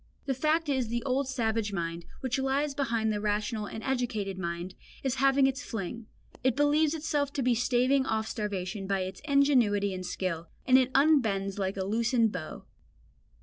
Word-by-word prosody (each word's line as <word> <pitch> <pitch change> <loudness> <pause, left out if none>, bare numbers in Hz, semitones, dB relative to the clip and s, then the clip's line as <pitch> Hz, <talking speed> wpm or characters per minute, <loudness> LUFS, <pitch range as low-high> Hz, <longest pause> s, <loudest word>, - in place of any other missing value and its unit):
The 270 - 0
fact 310 +4 +1
is 265 -3 +1
that - - -9
the 235 +1 -2
old 270 0 0
savage 225 -5 -1
mind, 170 -2 -3 0.2
which 260 0 -1
lies 275 +2 0
behind 230 -6 0
the 210 - -2
rational 210 +1 -1
and 220 - -7
educated 245 -7 -1
mind, 170 +1 -4 0.3
is 265 -1 -1
having 275 0 +5
its 270 +1 0
fling; 225 +1 -5 0.4
it 260 -2 +2
believes 295 +2 +3
itself 295 -3 -1
to 275 - -1
be 250 0 +3
staving 255 +3 +2
off 220 0 0
starvation 195 -2 -3
by 195 -1 0
its 185 0 -5
ingenuity 250 -9 +3
and 185 0 -5
skill, 180 -2 -3 0.2
and 260 0 +6
it 255 -1 +2
unbends 220 -10 +3
like 195 0 -2
a 190 - -1
loosened 230 +2 +2
bow. 160 -5 -6
235 Hz, 180 wpm, -29 LUFS, 200-270 Hz, 0.4 s, and